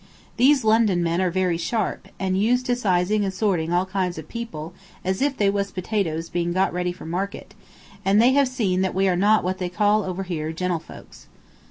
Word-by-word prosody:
These 265 +2 +4
London 215 -5 +3
men 170 +2 0
are 185 - +2
very 180 -1 0
sharp, 210 +1 -2
and 190 -1 0
used 240 +6 +2
to 245 - +1
sizing 205 -2 +1
and 195 - -1
sorting 185 -5 0
all 175 +1 +2
kinds 185 -2 -2
of 160 -1 -8
people 175 -9 -6 0.3
as 190 +3 -1
if 280 -1 +1
they 205 - +2
was 200 0 0
potatoes 180 -4 -2
being 175 0 -2
got 190 +2 +1
ready 180 0 -1
for 180 - -11
market, 185 +5 -4 0.5
and 195 +2 +3
they 240 +3 +6
have 280 0 +4
seen 210 -8 0
that 190 -1 -1
we 195 +1 +2
are 185 - +2
not 205 +4 +3
what 185 +2 -2
they 180 -1 -2
call 210 +3 +2
over 190 0 -4
here 160 -4 -3
gentlefolks." 175 0 -5
190 Hz, 205 wpm, -23 LUFS, 175-215 Hz, 0.5 s, they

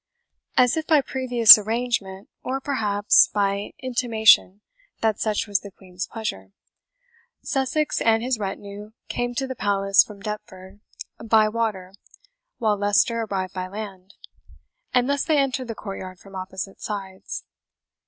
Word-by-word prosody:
As 250 -1 +4
if 315 -1 -3
by 310 -3 +4
previous 245 -5 +7
arrangement, 210 -3 -3
or 265 +1 -3
perhaps 210 -7 +3
by 200 0 -1
intimation 225 -5 +3 0.4
that 220 -2 0
such 215 -2 -1
was 205 -2 0
the 200 - -10
Queen's 185 -1 -8
pleasure, 95 - -6 0.9
Sussex 280 +3 -1
and 225 0 +2
his 250 -2 -1
retinue 205 +1 -7 0.2
came 245 0 -3
to 270 - -1
the 260 - -5
Palace 195 -3 +3
from 210 -2 -13
Deptford 195 -2 -8 0.4
by 220 -1 +4
water 215 -4 -3 0.6
while 215 -3 +1
Leicester 205 +3 +2
arrived 190 -2 -3
by 185 -1 -4
land; 200 -1 -9 0.8
and 250 0 +2
thus 280 0 0
they 310 -2 +1
entered 265 -2 0
the 230 - -5
courtyard 190 -3 -8
from 195 +2 -17
opposite 190 +1 -7
sides. 195 -2 -6
210 Hz, 135 wpm, -23 LUFS, 195-245 Hz, 0.9 s, previous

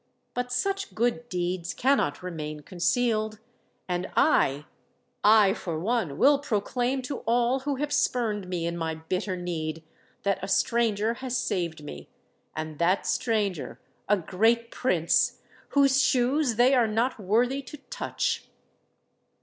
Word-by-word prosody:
But 245 0 -3
such 390 +10 -2
good 240 +1 0
deeds 175 -1 -2
cannot 255 - +1
remain 155 -4 -5
concealed; 215 +5 0 0.5
and 180 0 -2
I—I 205 - +2
for 165 -5 -4
one 190 - -1
will 280 - +5
proclaim 250 +1 -1
to 275 +2 -4
all 240 +3 +2
who 280 +1 -2
have 290 +2 -2
spurned 215 -6 0
me 175 -2 -2
in 170 0 -2
my 160 -1 -2
bitter 185 +4 -3
need, 165 -2 -4 0.4
that 200 -1 +1
a - - -2
stranger 225 0 +1
has 255 -1 -1
saved 170 -4 -2
me—and 150 - -10
that 180 +3 +2
stranger 200 - -1 0.3
a 210 - +5
great 225 +7 +1
Prince 175 -10 +1 0.3
whose 280 -1 +4
shoes 260 0 +2
they 245 +4 +5
are 245 -4 +4
not 230 +3 0
worthy 240 +7 +1
to 275 +3 -10
touch!" - - -2
215 Hz, 130 wpm, -27 LUFS, 175-245 Hz, 0.5 s, will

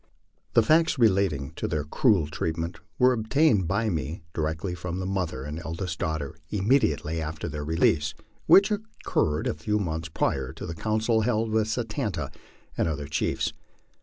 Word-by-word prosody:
The 115 - +7
facts 160 +5 +4
relating 95 - +2
to - - -2
their 75 -1 -1
cruel 95 - +3
treatment 80 +2 -3 0.2
were 125 0 +5
obtained 110 - +2
by 100 +5 +1
me 80 0 -3
directly 80 +3 -2
from 90 0 -4
the 95 - -3
mother 90 -9 -2
and 75 +3 -5
eldest 85 +1 -4
daughter 80 -1 -2
immediately 95 - +1
after 80 +1 -4
their 75 -2 -4
release, 80 0 +2 0.3
which 200 +2 +7
occurred 205 - -1
a - - +1
few 95 +8 -1
months 80 -4 -2
prior 65 -4 -1
to - - -7
the 80 - -4
council 110 +5 +1
held 110 -1 +1
with 110 -1 +2
Satan 115 0 -2
ta 80 -4 -3 0.5
and - - +1
other 75 -2 -2
chiefs. 75 - -1
85 Hz, 165 wpm, -27 LUFS, 80-110 Hz, 0.5 s, The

